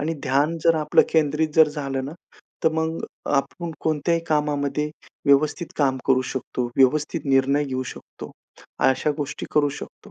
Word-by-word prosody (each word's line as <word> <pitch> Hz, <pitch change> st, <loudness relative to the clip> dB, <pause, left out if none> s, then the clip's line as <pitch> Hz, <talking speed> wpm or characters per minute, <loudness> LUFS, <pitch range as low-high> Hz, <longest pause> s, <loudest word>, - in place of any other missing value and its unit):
आणि 160 Hz, +3 st, -1 dB
ध्यान 145 Hz, +5 st, +1 dB
जर 165 Hz, -1 st, +5 dB
आपलं 150 Hz, -1 st, +4 dB
केंद्रित 155 Hz, 0 st, +1 dB
जर 160 Hz, -2 st, +6 dB
झालं 135 Hz, -3 st, -3 dB
ना, 145 Hz, -, -6 dB, 0.5 s
तर -, -, +7 dB
मग 160 Hz, +1 st, -1 dB, 0.4 s
आपण 165 Hz, +4 st, -1 dB
कोणत्याही 160 Hz, +2 st, 0 dB
कामामध्ये 150 Hz, 0 st, 0 dB, 0.4 s
व्यवस्थित 145 Hz, +4 st, +3 dB
काम 135 Hz, -3 st, +2 dB
करू 130 Hz, -1 st, +3 dB
शकतो. 130 Hz, -1 st, -3 dB
व्यवस्थित 150 Hz, +4 st, +2 dB
निर्णय 135 Hz, +1 st, +2 dB
घेऊ 130 Hz, -2 st, -3 dB
शकतो. 130 Hz, -, -10 dB, 0.5 s
अशा 130 Hz, +3 st, +2 dB
गोष्टी 145 Hz, -2 st, -4 dB
करू 145 Hz, -1 st, +4 dB
शकतो. 140 Hz, -, -10 dB
150 Hz, 150 wpm, -23 LUFS, 135-155 Hz, 0.5 s, तर